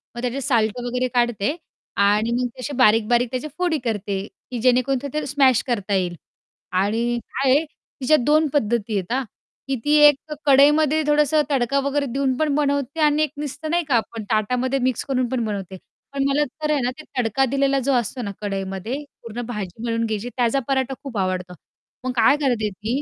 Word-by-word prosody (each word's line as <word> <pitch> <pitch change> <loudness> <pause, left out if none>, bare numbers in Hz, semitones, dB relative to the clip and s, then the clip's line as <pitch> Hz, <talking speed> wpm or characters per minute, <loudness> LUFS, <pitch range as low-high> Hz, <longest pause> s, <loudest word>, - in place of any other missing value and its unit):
मग 240 - -5
त्याचे 250 +2 -2
साल्ट 235 -4 +1
वगैरे 250 +1 -1
काढते 240 +2 +1 0.5
आणि 210 +3 +2
मग 245 +1 0
तसे 285 +3 -4
बारीक-बारीक 235 0 +4
त्याचे 255 +4 -3
फोडी 355 -3 +1
करते, 200 -3 -2 0.3
की 245 - -3
जेणेकरून 255 +2 +3
ते - - -2
ते 305 - -2
स्मॅश 270 -3 +3
करता 205 -5 -1
येईल. 180 -2 0 0.6
आणि 225 +6 +1
काय 270 -1 +2
आहे 290 +4 +4
तिच्या 300 -1 -1
2 305 +1 +4
पद्धती 230 -5 0
आहेत 190 +2 -4
हां. 265 +1 0 0.4
की 270 - 0
ती 295 - +3
एक 295 +1 +1
कढईमध्ये 295 +2 +5
थोडंसं 300 0 +3
तडका 275 0 +1
वगैरे 280 +1 0
देऊन 270 -1 +1
पण 305 -1 +1
बनवते 285 0 0
आणि 300 0 +4
एक 300 - -2
नुसतं 295 +1 -5
नाही 345 0 +2
का 265 - +2
आपण 225 0 -2
ताटामध्ये 250 +5 +1
मिक्स 255 -1 0
करून 255 -3 0
पण 255 -2 -1
बनवते. 195 -3 -5 0.4
पण 275 -1 0
मला 280 +2 +2 0.2
तर 300 - +1
आहे 290 -3 +1
ना 245 - 0
ते - - -8
तडका 250 +2 +2
दिलेला 275 0 +2
जो 270 +1 0
असतो 245 +1 -1
ना 205 -4 -4
कढईमध्ये 195 +1 -4 0.3
पूर्ण 230 +1 -6
भाजी 210 -2 -6
मळून 230 0 0
घ्यायची 220 +1 -3
त्याचा 245 +2 +2
पराठा 265 -1 0
खूप 265 -6 -6
आवडतो. 185 -1 -2 0.5
मग 255 - 0
काय 235 +5 +5
करते 245 -7 0
ती 220 +7 -3
250 Hz, 190 wpm, -22 LUFS, 220-280 Hz, 0.6 s, कढईमध्ये